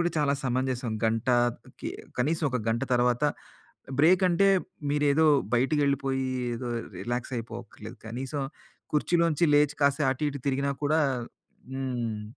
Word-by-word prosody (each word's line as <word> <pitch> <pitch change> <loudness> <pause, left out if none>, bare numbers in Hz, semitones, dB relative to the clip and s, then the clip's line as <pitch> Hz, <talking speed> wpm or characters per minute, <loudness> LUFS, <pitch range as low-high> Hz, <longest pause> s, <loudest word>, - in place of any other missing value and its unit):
గూడా 175 0 +1
చాలా 140 -1 +2
సమంజసం. 130 -2 -1
గంట 115 +3 0 0.5
కి - - -4 0.3
కనీసం 155 +6 +1
ఒక 125 - 0
గంట 115 +1 0
తర్వాత 125 +1 +2 0.8
బ్రేక్ 180 +5 +5
అంటే 195 +3 +4 0.4
మీరేదో 145 +2 +3 0.3
బయటికెళ్ళిపోయి 135 0 +1 0.3
ఏదో 120 +1 -5 0.3
రిలాక్స్ 120 +2 -3
అయిపోవక్కర్లేదు. 115 -1 -9
కనీసం 130 +5 -4 0.5
కుర్చీలోంచి 170 +1 +2
లేచి 150 0 +4
కాస్త 140 +1 +3
అటు 130 +3 -4
ఇటు 140 - -6
తిరిగినా 140 +1 0
కూడా 155 +2 +3 0.7
హ్మ్. 120 -5 -3
135 Hz, 120 wpm, -27 LUFS, 120-150 Hz, 0.8 s, బ్రేక్